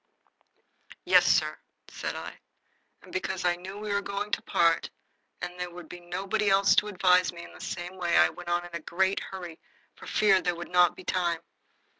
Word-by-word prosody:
"Yes, - - +6
sir," - - +2 0.3
said - - -5
I, - - -7 0.6
and - - -15
because 185 -1 -2
I 175 0 +3
knew 185 +3 -9
we 210 -1 -3
were 200 - +1
going 200 +1 -4
to - - 0
part 165 -1 +2 0.5
and 180 0 -6
there 180 0 -3
would 175 -1 -11
be 175 - -9
nobody 190 +4 -1
else 195 0 +5
to 210 - +4
advise 185 -2 +3
me 170 -1 -10
in - - -12
the - - -13
same 175 +1 -5
way, 175 -2 +1
I - - +6
went 175 -1 -9
on 175 0 0
in 175 - -12
a 170 - -3
great 190 +4 0
hurry 175 -4 -8 0.3
for - - -13
fear 200 -3 +4
there 175 0 0
should 175 +1 -7
not 180 -1 +5
be 185 - -11
time. 175 -3 0
180 Hz, 200 wpm, -28 LUFS, 175-195 Hz, 0.6 s, Yes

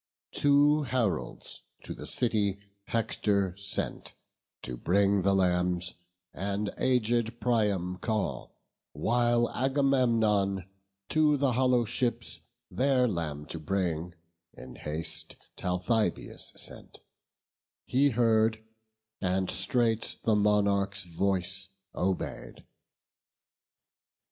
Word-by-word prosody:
Two 145 +1 +4
heralds 125 -7 -2 0.2
to - - -6
the - - -8
city 105 -5 +1 0.3
Hector 100 -4 0
sent 100 0 -3 0.5
To 65 - -4
bring 100 +9 +2
the 100 +1 +3
lambs, 90 -1 +1 0.4
and 100 +2 -2
aged 120 -2 +1
Priam 105 -6 +1
call; 110 0 -3 0.4
While 120 +8 +2
Agamemnon 115 -8 +2 0.4
to 150 -2 +3
the 140 -1 +2
hollow 125 -1 +3
ships, 120 0 -2 0.3
Their 130 -1 +3
lamb 80 -7 -3
to 80 - -6
bring, 85 0 -2 0.4
in 65 - -10
haste 75 +1 -3 0.2
Talthybius 90 +2 -1
sent: - - -6 0.8
He 140 +3 +3
heard, 110 -2 +3 0.6
and 95 0 0
straight 115 +3 +1
the 110 - +3
monarch's 100 -1 +2
voice 95 +2 -1 0.2
obey'd. 95 0 -3
105 Hz, 90 wpm, -29 LUFS, 95-120 Hz, 0.8 s, Two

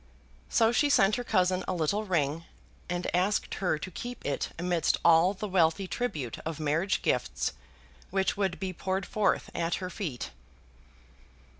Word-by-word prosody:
So 225 -1 +4
she 290 +4 +3
sent 205 -6 +5
her 245 - -3
cousin 185 -3 +2
a 185 - -1
little 180 +6 0
ring, 165 -3 0 0.4
and 175 0 -2
asked 190 +4 +1
her 180 -5 +2
to 185 - -7
keep 245 +7 -7
it 140 - -1
amidst 175 -1 +1
all 170 +4 +6
the 210 +2 -4
wealthy 185 0 +2
tribute 155 - -3
of 160 -1 -5
marriage 160 +5 0
gifts 65 0 0 0.6
which 190 0 +1
would 195 -3 -1
be 190 -1 -3
poured 190 +2 -2
forth 210 -2 0
at 170 0 0
her 185 -1 -5
feet. 160 - -4
180 Hz, 155 wpm, -29 LUFS, 165-195 Hz, 0.6 s, all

